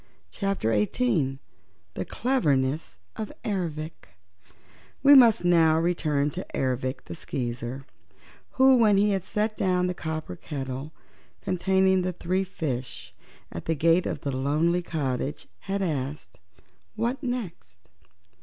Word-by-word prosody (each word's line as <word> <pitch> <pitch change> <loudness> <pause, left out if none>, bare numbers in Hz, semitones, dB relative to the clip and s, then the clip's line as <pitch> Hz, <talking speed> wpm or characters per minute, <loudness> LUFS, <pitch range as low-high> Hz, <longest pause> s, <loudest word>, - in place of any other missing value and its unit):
Chapter 195 - -1
Eighteen 135 - +1 0.6
The 95 - -4
Cleverness 145 - 0 0.2
of 215 - -4
Ervic 160 - -4 0.9
We 285 +1 +8
must 235 -9 +7
now 165 -2 +5
return 155 -4 +1
to 185 +4 -5
Ervic 130 0 -1
the - - -8
Skeezer, 125 -3 -5 0.7
who, 265 0 +6
when 215 -4 +5
he 205 +1 +3
had 195 -3 0
set 215 +2 -1
down 180 -2 +1
the 180 - -1
copper 160 - -5
kettle 135 - -6 0.5
containing 190 +1 +2
the 180 0 -2
three 185 +2 -1
fishes 135 -9 -5 0.4
at 85 - -7
the 165 - 0
gate 165 +4 +3
of - - -4
the 140 -2 -3
lonely 155 +6 +1
cottage, 135 - -3
had 195 - -2
asked, 135 - -4 0.6
"What 235 +5 -1
next?" 175 - -6
165 Hz, 125 wpm, -26 LUFS, 135-195 Hz, 0.9 s, We